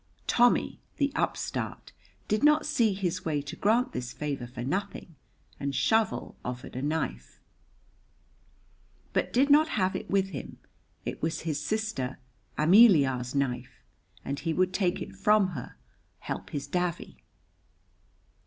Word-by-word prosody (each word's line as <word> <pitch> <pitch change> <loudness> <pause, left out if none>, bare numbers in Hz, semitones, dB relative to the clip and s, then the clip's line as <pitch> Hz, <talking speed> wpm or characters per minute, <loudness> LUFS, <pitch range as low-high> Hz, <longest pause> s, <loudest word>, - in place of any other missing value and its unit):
Tommy, 245 0 +3 0.2
the 285 -1 +1
upstart, - - -3 0.4
did 215 +4 0
not 300 +1 +5
see 235 -8 +2
his 185 -3 -2
way 155 -3 0
to 140 0 -7
grant 225 +5 +2
this 125 -1 -5
favor 140 -5 -4
for 120 0 -7
nothing, 185 +3 -4 0.4
and 140 -1 -2
Shovel 190 - +1
offered 125 0 -6
a 130 - -3
knife, 155 +3 -3 1.7
but - - 0
did 275 +4 +3
not 305 +2 +6
have 185 -1 +1
it - - -5
with 195 -1 +2
him; 145 -8 -7 0.5
it - - -5
was 160 +1 -1
his 155 -3 -2
sister 215 -12 -2 0.4
Ameliar's 150 - +5
knife, 130 -2 -2 0.4
and 140 +1 -3
he 165 -1 -1
would 185 +2 +1
take 180 -3 0
it - - -11
from 200 0 +3
her, 145 -10 -7 0.4
help - - -6
his 140 -1 -4
davy. 180 -1 -3
170 Hz, 135 wpm, -28 LUFS, 140-215 Hz, 1.7 s, not